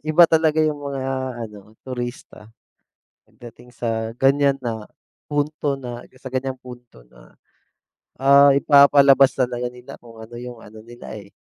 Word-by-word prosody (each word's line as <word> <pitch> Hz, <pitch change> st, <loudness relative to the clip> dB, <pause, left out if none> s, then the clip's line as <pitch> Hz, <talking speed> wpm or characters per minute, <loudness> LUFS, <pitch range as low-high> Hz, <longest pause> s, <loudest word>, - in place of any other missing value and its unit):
iba 155 Hz, +3 st, +5 dB
talaga 160 Hz, -1 st, +2 dB
'yung 155 Hz, -1 st, +1 dB
mga 140 Hz, -2 st, -6 dB, 0.5 s
ano, 105 Hz, 0 st, -16 dB
turista 120 Hz, -3 st, -8 dB, 0.7 s
pagdating 120 Hz, +1 st, -15 dB
sa 115 Hz, -1 st, -3 dB
ganyan 140 Hz, 0 st, +3 dB
na 115 Hz, -4 st, -5 dB, 0.4 s
punto 145 Hz, 0 st, -2 dB
na 120 Hz, -1 st, -8 dB, 0.2 s
sa 135 Hz, -, -8 dB
ganyang 130 Hz, 0 st, -4 dB
punto 125 Hz, -, -14 dB
na, -, -, -20 dB, 0.8 s
ah, 140 Hz, +1 st, +5 dB
ipapalabas 140 Hz, -1 st, +5 dB
talaga 125 Hz, -1 st, -2 dB
nila 125 Hz, +2 st, -13 dB
kung 115 Hz, -1 st, -16 dB
ano 110 Hz, +1 st, -12 dB
'yung 125 Hz, -2 st, -10 dB
ano 110 Hz, +1 st, -13 dB
nila, 120 Hz, 0 st, -12 dB
eh. 100 Hz, 0 st, -17 dB
125 Hz, 135 wpm, -21 LUFS, 120-140 Hz, 0.8 s, iba